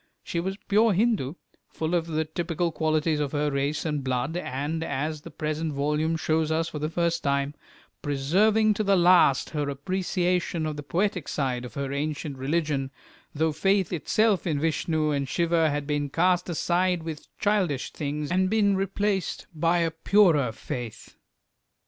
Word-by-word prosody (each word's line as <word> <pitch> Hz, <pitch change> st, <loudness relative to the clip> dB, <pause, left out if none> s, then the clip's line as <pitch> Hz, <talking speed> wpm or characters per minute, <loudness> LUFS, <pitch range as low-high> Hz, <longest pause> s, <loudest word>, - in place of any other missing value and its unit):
She 170 Hz, -, -3 dB
was 190 Hz, +3 st, -3 dB
pure 215 Hz, +1 st, +4 dB
Hindu, 190 Hz, -, +1 dB, 0.3 s
full 160 Hz, +1 st, -3 dB
of 170 Hz, -1 st, +1 dB
the 160 Hz, -1 st, -1 dB
typical 170 Hz, +1 st, -2 dB
qualities 155 Hz, 0 st, +1 dB
of 145 Hz, -1 st, -2 dB
her 150 Hz, 0 st, 0 dB
race 140 Hz, +3 st, -1 dB
and 150 Hz, -3 st, -1 dB
blood, 130 Hz, +4 st, -1 dB
and, 155 Hz, 0 st, -3 dB
as 155 Hz, 0 st, -3 dB
the -, -, -10 dB
present 155 Hz, 0 st, -3 dB
volume 150 Hz, +3 st, 0 dB
shows 160 Hz, 0 st, 0 dB
us 160 Hz, +1 st, +1 dB
for 155 Hz, -, -6 dB
the 155 Hz, +1 st, -2 dB
first 170 Hz, 0 st, 0 dB
time, 140 Hz, 0 st, 0 dB, 0.5 s
preserving 200 Hz, +10 st, +2 dB
to 215 Hz, -, -1 dB
the 200 Hz, -1 st, +3 dB
last 175 Hz, -6 st, +4 dB
her 150 Hz, -2 st, -2 dB
appreciation 180 Hz, +2 st, -1 dB
of 155 Hz, -1 st, -3 dB
the 145 Hz, -, -5 dB
poetic 180 Hz, +4 st, -1 dB
side 125 Hz, -4 st, -2 dB
of 120 Hz, -, -10 dB
her 140 Hz, -1 st, -3 dB
ancient 145 Hz, -1 st, -3 dB
religion, 145 Hz, -1 st, -1 dB, 0.5 s
though 160 Hz, +2 st, +1 dB
faith 190 Hz, +3 st, +1 dB
itself 200 Hz, +3 st, +1 dB
in 150 Hz, -4 st, 0 dB
Vishnu 155 Hz, 0 st, 0 dB
and 140 Hz, -2 st, -1 dB
Siva 165 Hz, -1 st, +2 dB
had 145 Hz, 0 st, -2 dB
been 145 Hz, -1 st, -1 dB
cast 180 Hz, +4 st, +2 dB
aside 175 Hz, +1 st, +1 dB
with 160 Hz, -2 st, -7 dB
childish 190 Hz, -10 st, 0 dB
things 150 Hz, +1 st, -3 dB
and 185 Hz, +1 st, +2 dB
been 205 Hz, -2 st, +3 dB
replaced 195 Hz, 0 st, -1 dB
by 165 Hz, +2 st, +2 dB
a 165 Hz, -1 st, +1 dB
purer 160 Hz, -, +3 dB
faith. 115 Hz, +1 st, -7 dB
160 Hz, 165 wpm, -26 LUFS, 145-180 Hz, 0.5 s, pure